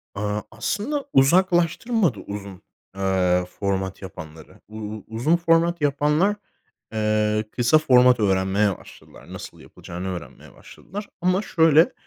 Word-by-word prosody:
Aaa, 105 +1 -2
aslında 280 +7 -3
uzaklaştırmadı 175 - +2
uzun, 100 -2 -8 0.3
eee, 90 -2 +1
format 95 -1 -2
yapanları. 80 -4 -11
U 110 - -13
u 105 -1 -7
uzun 120 +10 +1
format 170 0 +2
yapanlar, 150 +8 +2 0.6
eee, 110 0 +1
kısa 125 +5 +3
format 125 -4 +5
öğrenmeye 95 0 +1
başladılar. - - -15
Nasıl - - -9
yapılacağını 90 +2 -9
öğrenmeye - - -11
başladılar. 200 +4 -10
Ama 185 +2 +2
şöyle; 165 -4 +4
115 Hz, 115 wpm, -23 LUFS, -, 0.6 s, format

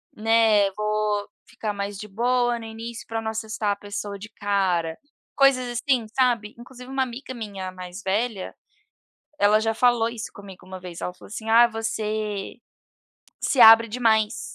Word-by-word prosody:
né, 220 -2 +3
vou 210 0 -1 0.2
ficar 210 -2 -5
mais 200 0 -4
de 210 +2 -8
boa 240 +3 +1
no 225 - -9
início 225 +1 -8
pra 225 0 -3
não 220 0 -3
assustar 220 -1 -2
a - - -6
pessoa 205 0 -6
de 210 +2 -10
cara." 190 -6 -1 0.4
Coisas 265 -3 +4
assim, 255 -5 +1
sabe, 240 -5 +1
inclusive 250 +1 -12
uma 270 0 0
amiga 255 +1 -7
minha 200 -5 -6
mais 180 +2 -9
velha, 205 +1 -2 0.8
ela 210 +1 +5
já 225 0 0
falou 235 -1 +3
isso 230 -1 -7
comigo 195 -3 -12
uma 185 0 -8
vez, 180 -2 -9
ela 180 - -3
falou - - -15
assim: 220 +1 -7
"Ai, 235 +1 +7
você 215 -2 -3 0.9
se 270 - +1
abre 225 0 +9
demais." 220 -2 +1
220 Hz, 160 wpm, -24 LUFS, 205-235 Hz, 0.9 s, abre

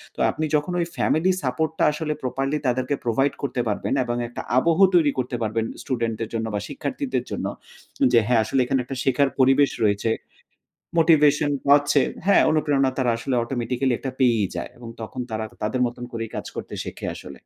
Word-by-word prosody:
তো - - -13
আপনি 155 - -2
যখন 150 +4 0
ওই 170 - +1
ফ্যামিলি 175 +4 +2
সাপোর্ট 135 +5 0
টা - - +3
আসলে 150 0 -2
প্রপারলি 135 +3 -1
তাদেরকে 130 +3 0
প্রোভাইড 135 +4 +1
করতে 130 -3 -1
পারবেন 105 +5 -1
এবং 120 -1 -2
একটা 120 - -6 0.2
আবহ 165 +6 +3 0.2
তৈরি 155 -4 +5
করতে 125 0 -2
পারবেন 110 0 -1 0.2
স্টুডেন্ট 115 -4 -2
দের 115 - -3
জন্য 115 0 -1
বা - - 0
শিক্ষার্থীদের - - -3
জন্য, - - -3 0.7
যে 120 - +7
হ্যাঁ, 120 -2 +4
আসলে 110 +5 0
এখানে 135 +1 +1
একটা 135 +2 -5
শেখার 135 +1 +2
পরিবেশ 135 +2 +5 0.2
রয়েছে 105 +2 +1 0.9
মোটিভেশন 150 -2 +4 0.2
পাচ্ছে 145 0 +5 0.3
হ্যাঁ, 200 - +6
অনুপ্রেরণা 145 -4 +2
তারা 125 -2 +2
আসলে 125 +3 -3
অটোমেটিক্যালি 125 +1 -1
একটা 135 - -4
পেয়েই 115 -6 +3
যায়। 85 - -4
এবং 120 -1 -9
তখন 110 +3 -6
তারা 110 0 -2 0.2
তাদের 125 +4 -1
মত 120 - -5 0.2
করেই 115 -1 -4
কাজ - - -5
করতে - - -6
শেখে - - -6
আসলে। - - -10
130 Hz, 180 wpm, -23 LUFS, 115-145 Hz, 0.9 s, যে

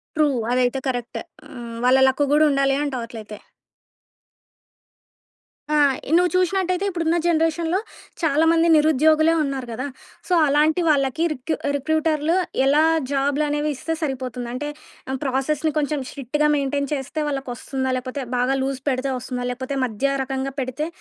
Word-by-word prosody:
True. 305 -1 +4 0.2
అదైతే 250 +1 +1
correct. 245 -2 -3 0.3
ఆహ్, 240 -4 -8
వాళ్ళ 255 +1 +5
లక్ 265 +2 +2
కూడా 305 +1 +5
ఉండాలి 275 0 +2
అంటావు 260 -5 -3
అట్లైతే. 215 -2 -9 2.4
ఆ - - +4 0.3
ఈ - - -3
నువ్వు 360 0 +3
చూషినట్టయితే 365 +1 +1
ఇప్పుడున్న 335 -2 0
జనరేషన్‌లో 330 +1 +1 0.4
చాలామంది 325 +2 +3
నిరుద్యోగులే 310 +1 +4
ఉన్నారు 270 -3 -3
గదా! 255 +5 -4 0.4
సో 365 - 0
అలాంటి 300 +4 +3
వాళ్ళకి 275 +1 +1
రిక్ 290 +2 -5 0.2
రిక్రూటర్లు 315 +2 +1 0.3
ఎలా 290 +3 +4 0.3
జాబ్లనేవి 290 +2 0
ఇస్తే 325 +5 -3
సరిపోతుంది. 255 -4 -3
అంటే 280 +4 -4 0.6
ప్రాసెస్‌ని 285 +3 0
కొంచెం 300 0 0
స్ట్రిక్ట్‌గా 295 +3 -1
మెయింటైన్ 280 0 -1
చేస్తే 280 +2 -4
వాళ్ళకొస్తుందా 265 -1 -3
లేపోతే 255 +2 -5 0.2
బాగా 250 +2 +2
లూజ్ 270 0 -2
పెడితే 260 0 -1
వస్తుందా? 250 0 -4
లేకపోతే 260 +2 -4
మధ్య 255 +4 -1
రకంగా 265 0 -3
పెడితే 260 +4 -3
280 Hz, 130 wpm, -22 LUFS, 260-310 Hz, 2.4 s, వాళ్ళ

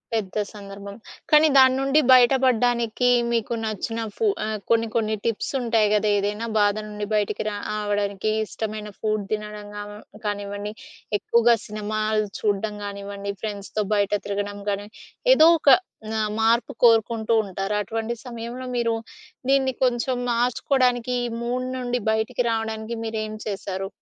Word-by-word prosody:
పెద్ద 210 -2 -2 0.2
సందర్భం. 200 0 -9 0.4
కానీ, 305 +1 +7
దాని 260 0 +7
నుండి 275 +3 +3
బయట 250 +1 +7
పడ్డానికి, 245 -1 +2 0.2
మీకు 230 0 0
నచ్చిన 220 +2 -3 0.2
ఫు 445 - +1 0.2
ఆహ్, 215 0 -2
కొన్ని, 230 0 +3
కొన్ని 220 -1 +1
టిప్స్ 230 -2 -1
ఉంటాయి 225 -3 +2
గదా, 210 0 +2
ఏదైనా 210 +3 -2
బాధ 205 0 +3
నుండి 210 0 -5
బయటికి 210 0 0
రావడానికి 205 0 -2
ఇష్టమైన 215 -1 -5
ఫుడ్ 215 -1 0
తినడం 210 -1 -4
గా 205 - -4 0.4
కానివ్వండి, 205 0 -3 0.5
ఎక్కువగా 235 0 +4
సినిమాలు 215 0 -1
చూడడం 210 0 -1
గానివ్వండి 200 0 -5
ఫ్రెండ్స్‌‌తో 210 0 -3
బయట 200 -1 +2 0.2
తిరగడం 205 0 -3
గాని, 205 +1 -2 0.5
ఏదో 320 - +7
ఒక 285 - +4 0.4
న - - -3 0.3
మార్పు 230 +2 +3
కోరుకుంటూ 225 -1 +4
ఉంటారు 195 +1 -3
అటువంటి 225 +3 -3
సమయంలో 240 +1 -6
మీరు 230 -1 +1 0.6
దీన్ని 270 -1 +3
కొంచెం 250 +1 +1 0.2
మార్చుకోవడానికి, 250 0 +1
ఈ - - -1
మూడ్ 250 +2 -2
నుండి 245 0 -1
బయటికి 220 +2 0
రావడానికి 225 0 -3
మీరు 220 0 -3
ఏం 215 - -6
చేసారు? 195 -1 -4
220 Hz, 135 wpm, -24 LUFS, 205-235 Hz, 0.6 s, కానీ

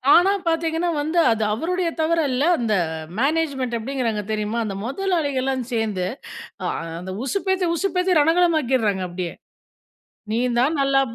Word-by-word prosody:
ஆனா 365 +3 +5 0.2
பாத்தீங்கன்னா 330 +1 0
வந்து, 315 +4 -2
அது 220 -1 0
அவருடைய 345 +7 -1
தவறு 330 +1 +2
அல்ல. 255 +3 0
அந்த 225 -3 0 0.2
அ 155 - -8
மேனேஜ்மென்ட் 275 -4 0
எப்படிங்கிறாங்க 230 -3 -2
தெரியுமா? 215 +1 -2
அந்த 200 -2 -4
முதலாளிகள்லாம் 275 -5 -1
சேந்து 215 -6 -1 0.6
அ - - +1 0.3
அந்த 185 +1 -6
உசுப்பேத்தி, 380 +3 0
உசுப்பேத்தி 365 -2 +2
ரணகளமாக்கிடுறாங்க. 290 - +2
அப்படியே. 175 -1 -4 1.0
நீ 225 - +1 0.2
தான் 270 +6 +3
நல்லா 275 0 +3
ப - - -9
275 Hz, 135 wpm, -22 LUFS, 225-335 Hz, 1.0 s, ஆனா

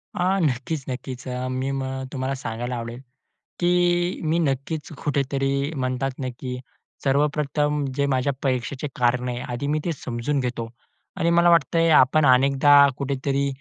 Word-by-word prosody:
आ, 185 +2 +1
नक्कीच 140 -1 -1
नक्कीच 130 0 -6
अ, 125 0 -3
मी 130 +1 -2
मग 135 -1 -3
तुम्हाला 135 0 -2
सांगायला 120 -1 -4
आवडेल, 115 0 -6 0.6
की 175 0 +2
मी 160 +1 +1
नक्कीच 150 +1 -2
कुठेतरी 140 0 0
म्हणतात 130 0 -1
ना 130 - -2
की 125 -1 -4 0.5
सर्वप्रथम 145 +1 +1
जे 140 0 +1
माझ्या 135 +1 +1
परीक्षेचे 130 +2 -1
कारण 125 +1 +1
आहे, 120 0 -3
आधी 120 +4 -3
मी 150 +1 +1
ते 175 - 0
समजून 130 +1 -2
घेतो. 120 -3 -3 0.5
आणि 165 - +1
मला 170 0 +5
वाटतंय 165 0 +3
आपण 150 +1 +5
अनेकदा 135 +2 +5 0.2
कुठेतरी, 140 0 -1
135 Hz, 145 wpm, -23 LUFS, 130-150 Hz, 0.6 s, मला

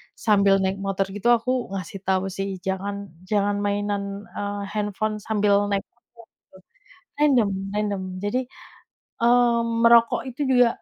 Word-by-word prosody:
sambil 200 -2 +3
naik 190 +1 0
motor 195 0 -1
gitu 205 +3 -2
aku 240 -1 +1
ngasih 195 0 -5
tahu 190 0 +1
sih, 195 +1 -3 0.2
jangan 200 +1 -3 0.2
jangan 205 +1 +1
mainan 200 0 -2
eee, 205 0 -3
handphone 215 0 -2
sambil 205 -2 +2
naik 200 -1 +1
motor. 235 -1 -20 1.0
Random 270 -8 +4 0.3
random. 205 -2 -1 0.2
Jadi, 205 +5 0 0.8
eee, 240 0 +4 0.2
merokok 235 0 +5
itu 255 +3 -5
juga 250 -2 +5
205 Hz, 130 wpm, -24 LUFS, 200-235 Hz, 1.0 s, merokok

